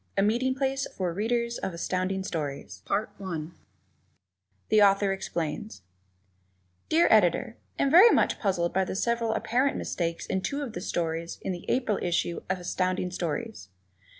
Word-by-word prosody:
A - - +4
Meeting 245 +5 +1
Place 270 0 -1
for 180 -3 -1
Readers 235 +4 -1
of 185 - -4
Astounding 185 +2 -1
Stories 140 - -5
[Illustration: 205 +2 0
The 195 - -8
Readers' - - -4
Corner] 160 -1 -4 1.2
The 215 -1 +5
Author 195 -1 +4
Explains 170 - -4 1.1
Dear 330 +2 +4
Editor: 215 +2 +3 0.2
Am 275 - +2
very 370 +9 +9
much - - +2
puzzled 180 -5 0
by 190 - +2
the 185 - -4
several 235 +2 0
apparent 255 +5 +1
mistakes 170 -1 -3
in 190 - -1
two 285 +8 -2
of 245 -6 -6
the 175 - -5
stories 165 -1 -2
in - - -2
the 175 -1 -6
April 245 -6 +1
issue 175 -1 -1
of 185 - +1
Astounding 180 0 -1
Stories. 180 - -4
190 Hz, 160 wpm, -27 LUFS, 175-235 Hz, 1.2 s, very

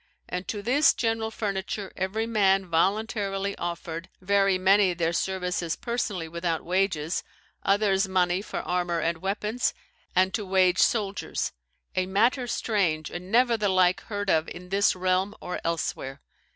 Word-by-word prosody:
And 180 +1 -4
to 205 -2 -4
this 280 +6 +4
general 225 -1 0
furniture 200 -2 -4
every 195 +4 -1
man 195 -4 +3
voluntarily 200 +3 0
offered, 170 0 -5
very 195 0 +3
many 190 0 +4
their 165 -1 0
services 180 -2 -1
personally 215 -8 -3
without 170 0 -2
wages, 180 -3 0 0.4
others 195 -1 +2
money 185 -1 +1
for 210 - -5
armour 175 -1 -1
and 165 +1 -1
weapons, 210 +6 -1 0.4
and 185 +1 +3
to 220 - -1
wage 185 -1 +3
soldiers: 205 -3 0 0.4
a 185 0 +1
matter 235 +6 +2
strange, 180 -10 0
and 180 +2 -7
never 240 0 +4
the 210 -2 +1
like 185 -1 +3
heard 205 -2 -2
of 160 0 +2
in 180 0 -9
this 200 +1 +3
realm 185 +2 0
or 180 - -5
else 165 0 -1
where. 135 +1 -8
190 Hz, 150 wpm, -26 LUFS, 180-205 Hz, 0.4 s, this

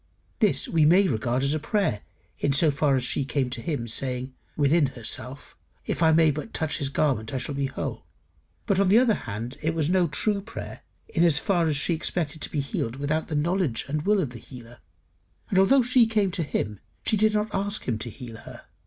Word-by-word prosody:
This 210 -4 +2
we 165 -2 +2
may 180 +6 +5
regard 120 0 0
as 140 +1 +1
a 155 - -1
prayer 170 - 0 0.4
in 140 - +1
so 150 +2 +4
far 140 0 +2
as 130 - 0
she 140 - +1
came 135 -2 -1
to 120 - -4
him, 130 -5 -3
saying 130 +2 -4 0.2
"within 145 +1 +3
herself, 125 +3 -7 0.3
If - - -3
I 160 -1 +5
may 160 -1 +5
but 150 +10 -6
touch 160 0 -1
his 140 -2 -1
garment, 135 -6 0
I - - +1
shall 135 +3 -3
be 140 0 -1
whole." 135 - -5 0.6
But, 195 -2 +1
on 200 -2 +3
the 205 - +6
other 240 -2 +4
hand, 115 - -6
it 160 +1 -1
was 160 0 0
no 180 -2 +3
true 200 +6 +1
prayer 225 +3 -8 0.3
in 170 - +1
as 165 -5 +4
far 175 -2 +1
as 150 -2 +1
she 160 +5 +1
expected 160 -1 -2
to - - -4
be 150 - -1
healed 120 -3 -3
without 145 +3 -2
the 155 - -3
knowledge 170 -3 0
and 150 +2 -2
will 205 +5 +2
of 140 - -3
the 120 - -9
healer. 120 -2 -13 0.8
Although 220 +8 +5
she 245 -1 +4
came 210 -4 +1
to 180 -1 -3
him, 105 -9 -3 0.3
she - - +2
did 215 +1 +2
not 210 0 -1
ask 200 +2 -2
him 115 -4 -1
to 120 - -5
heal 115 -1 -9
her. - - -12
150 Hz, 220 wpm, -25 LUFS, 130-185 Hz, 0.8 s, the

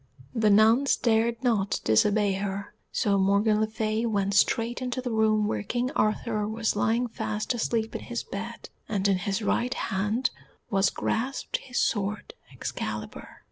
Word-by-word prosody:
The 220 -3 +2
nuns 220 +7 +5
dared 230 +1 +1
not 215 -6 +1
disobey 205 - +3
her, 195 0 -4 0.2
so 200 -1 +1
Morgan 200 +3 +3
le 220 - +2
Fay 220 0 -1
went 200 -2 0
straight 230 +4 +2
into 255 0 -2
the 250 -1 -3
room 215 -1 +2
where 110 - -1
King 245 - -2
Arthur 215 0 0
was 220 0 -1
lying 225 +4 +1
fast 215 0 -3
asleep 225 -1 -1
in - - -4
his 240 -1 -4
bed, 225 +4 -7 0.2
and 205 -2 +1
in 195 -2 +3
his 200 +3 -2
right 245 +4 0
hand 210 +5 -1 0.4
was 195 -1 +3
grasped 260 +5 -2
his 250 -2 -7
sword 205 - -1 0.2
Excalibur. - - -5
215 Hz, 155 wpm, -27 LUFS, 200-230 Hz, 0.4 s, nuns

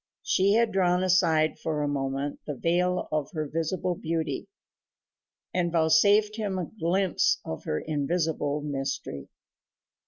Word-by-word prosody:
She 195 +2 +3
had 230 0 +3
drawn 180 -1 +2
aside 170 -4 +3
for 155 -2 -2
a - - 0
moment 140 0 -2
the 145 - -3
veil 180 +5 0
of 155 -2 -1
her 155 -2 -2
visible 165 +4 -1
beauty, 165 -1 -3 1.1
and 175 -1 0
vouchsafed 200 +7 +4
him 205 -4 -2
a 180 - -2
glimpse 180 +2 +2
of 80 - -6
her 75 - -1
invisible 150 -1 -1
mystery. 135 - -4
165 Hz, 130 wpm, -27 LUFS, 150-185 Hz, 1.1 s, vouchsafed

